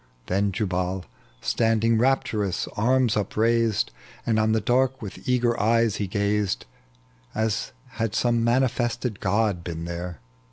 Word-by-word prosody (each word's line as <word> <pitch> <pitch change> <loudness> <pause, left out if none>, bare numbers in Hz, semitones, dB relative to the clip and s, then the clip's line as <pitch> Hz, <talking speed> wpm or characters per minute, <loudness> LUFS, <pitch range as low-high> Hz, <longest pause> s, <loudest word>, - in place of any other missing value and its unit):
Then 100 +5 +1
Jubal, 90 -2 -2 0.4
standing, 115 0 +2
rapturous 110 -7 +1
arms 125 +1 +2
upraised. 110 - +1 0.3
And 110 -2 +2
on 110 0 +2
the 110 - +3
dark 130 +5 +1
with 105 +4 -7
eager 120 -2 +2
eyes 115 0 +3
he 100 - -2
gazed, 100 -5 0 0.7
As 110 0 -1 0.2
had 115 -4 -3
some 115 0 +2
manifested 120 -2 +1
god 100 -2 +1
been 85 -1 -5
there. 85 -2 -5
110 Hz, 125 wpm, -25 LUFS, 100-115 Hz, 0.7 s, the